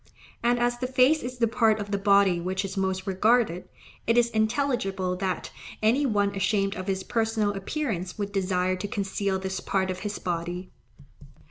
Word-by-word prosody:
And 240 +1 +2
as 240 0 0
the 255 - -1
face 260 +4 +4
is 250 +1 -6
the 235 -1 +3
part 225 -1 +2
of 205 0 -5
the 200 - +1
body 200 -3 +4
which 190 +2 -2
is 195 - -5
most 190 -1 -1
regarded, 200 -1 +2 0.4
it 230 +1 +3
is 235 -1 +4
intelligible 220 -5 0
that 185 -1 -3 0.3
any 260 +6 +3
one 205 -3 +1
ashamed 195 0 0
of 185 +1 -6
his 190 -1 -1
personal 225 -2 0
appearance 195 - -3
would 205 -1 -3
desire 185 -2 0
to 185 +2 -4
conceal 200 -2 -1
this 190 0 -3
part 190 -1 0
of 185 - -5
his 210 0 -4
body. 175 +1 -4
200 Hz, 175 wpm, -26 LUFS, 190-230 Hz, 0.4 s, face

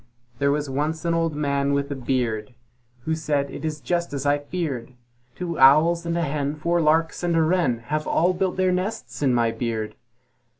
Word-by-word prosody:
There 140 - +2
was 145 +1 0
once 150 +5 -2
an 170 - +2
Old 165 -2 0
Man 140 -1 0
with 140 0 -1
a - - -2
beard, 120 -4 -2 0.5
Who 160 +6 -2
said, 145 -3 -1
"It - - -8
is 155 -1 -3
just 170 +1 -2
as 140 0 -3
I 145 0 +3
feared! 145 -6 -4 0.4
Two 170 -2 -4
Owls 160 +6 +5
and 170 0 0
a 170 - +1
Hen, 145 -1 -2
Four 170 +3 0
Larks 160 +1 +2
and 175 -1 0
a 165 - +4
Wren 155 -8 +1
Have 155 +2 -2
all 175 +3 +2
built 185 +1 -1
their 185 -1 +2
nests 180 - -3
in 140 -3 +3
my 120 -2 +2
beard." 115 -1 -3
150 Hz, 200 wpm, -24 LUFS, 135-170 Hz, 0.5 s, Owls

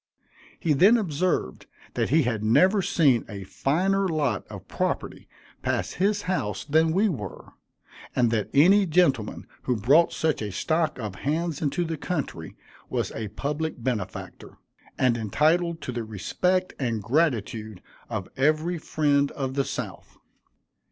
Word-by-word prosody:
He 160 - +1
then 200 +11 +6
observed 175 - -1 0.3
that - - 0
he 155 +4 +4
had 115 -4 -1
never 185 - +4
seen 140 -10 +3
a 100 -2 -6
finer 190 - 0
lot 145 - -1
of - - -10
property - - -3 0.3
pass - - -1
his 200 +2 0
house 105 - -2
than 160 +2 +3
we 195 +6 +3
were, 115 - -5 0.7
and 120 -2 +3
that 110 -3 -1
any 190 +7 +5
gentleman 150 -10 +1 0.2
who 125 - 0
brought 140 +11 +4
such 160 -6 0
a 105 -1 -3
stock 155 - 0
of 105 -6 -5
hands 160 +1 -1
into 150 +3 0
the 160 -1 -3
country 140 - -4 0.3
was - - -2
a 110 -1 -4
public 145 +5 -4
benefactor, 125 -4 -4 0.4
and 125 -2 +2
entitled 160 - +1
to - - -4
the 120 -1 -3
respect 180 - -1
and 115 -6 -1
gratitude 115 - 0 0.3
of - - -4
every 155 +5 +1
friend 145 -2 +1
of 135 -2 -3
the 140 0 +1
South. - - -6
145 Hz, 145 wpm, -26 LUFS, 115-170 Hz, 0.7 s, then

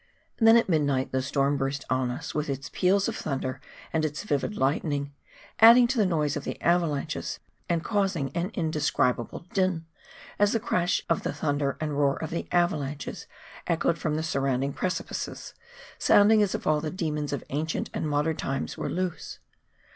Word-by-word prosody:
Then 225 0 +7
at 230 - +2
midnight 145 -6 +1
the 130 - 0
storm 140 +1 +1
burst 135 0 -2
on 130 -1 0
us, 125 - -5
with 150 -1 -2
its 140 +1 -4
peals 195 +2 +2
of - - -2
thunder 135 -3 -3 0.3
and 160 -1 +1
its 150 0 -2
vivid 205 +2 -1
lightning, 140 +1 0 0.5
adding 235 +2 +9
to 265 - 0
the 205 - +4
noise 150 -4 0
of 145 - -4
the - - -5
avalanches, 165 -3 0 0.3
and 170 -1 +1
causing 190 - 0
an 175 +2 -1
indescribable 150 - 0
din, 185 -5 +1 0.5
as 205 0 +4
the 230 - +2
crash 180 -5 0
of 165 - +1
the - - -2
thunder 145 -2 -1
and 150 -2 -2
roar 140 -1 +3
of 160 - -5
the 170 - -3
avalanches 150 -5 -1 0.4
echoed 170 0 +1
from 155 -2 -1
the 160 - -1
surround 135 -4 0
ing 140 0 -2
precipices, 185 0 -4 0.5
sounding 210 +1 +5
as 205 -2 +1
if - - -5
all 150 -1 +2
the 155 - -3
demons 150 -4 -3
of 140 - -3
ancient 155 +3 -2
and 155 - -2
modern 150 +2 +1
times 135 0 -3
were - - -2
loose. 180 -1 -3
155 Hz, 175 wpm, -27 LUFS, 140-180 Hz, 0.5 s, adding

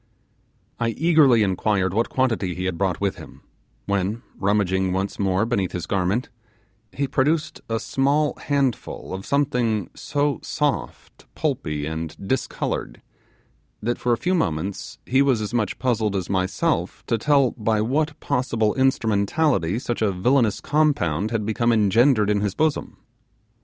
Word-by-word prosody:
I 115 -1 +1
eagerly 150 -8 +5
inquired 95 -1 0
what 115 +3 +1
quantity 115 -9 0
he 90 - -4
had 95 -2 -1
brought 95 -1 -1
with 100 -1 -1
him, - - -13 0.4
when 100 +3 -1
rummaging 95 -2 +1
once 95 +1 -2
more 95 +1 +1
beneath 100 -6 -1
his 90 -2 -3
garment, 100 +6 0 0.6
he 140 0 -2
produced 150 +5 0
a 115 0 0
small 145 +5 +1
handful 140 -9 -1
of 95 +1 -6
something 125 -8 0
so 145 -1 -1
soft, 145 -2 -3
pulpy, 80 - -2
and 80 +1 -5
discoloured, 120 - -2 0.8
that 120 +2 -1
for 125 - 0
a 120 - +3
few 180 - 0
moments 95 - -2
he 130 +2 +3
was 135 -5 +3
as 105 +1 -4
much 115 -3 0
puzzled 110 -5 0
as 95 -1 -2
myself 95 -1 -1
to 115 - 0
tell 140 -1 +3
by 110 -2 0
what 145 +7 0
possible 115 -4 0
instrumentality 115 - +1
such 120 -2 -3
a 105 -2 +2
villainous 115 +4 +2
compound 110 - +1
had 110 -3 -2
become 115 +2 +1
engendered 110 +1 +4
in 100 -1 +1
his 105 -2 -1
bosom. 155 -1 -1
110 Hz, 145 wpm, -23 LUFS, 95-135 Hz, 0.8 s, eagerly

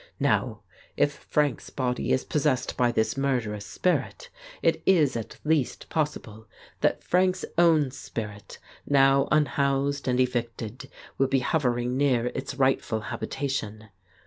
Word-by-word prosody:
Now - - 0 0.4
if - - +2 0.2
Frank's 145 -5 0
body 125 -2 -2
is 130 - +2
possessed 140 -4 0
by 120 -1 +2
this 110 -1 0
murderous 120 -7 -1
spirit, 175 - -1 0.3
it - - +2
is 155 -8 +4
at 115 -2 -5
least 150 -4 0
pos 150 -2 0
sible 110 0 -14 0.3
that - - +1
Frank's 185 +1 +1
own 160 -5 +4
spirit, 105 -5 -7 0.3
now 135 0 +4
unhoused 140 -2 +1
and 125 0 +1
evicted, 120 -2 -2 0.3
will 135 - +4
be 135 0 +1
hovering 125 -3 0
near 125 -4 +2
its 135 +1 -5
rightful 130 -5 +1
habitation. 110 -5 -4
130 Hz, 130 wpm, -26 LUFS, 120-145 Hz, 0.4 s, is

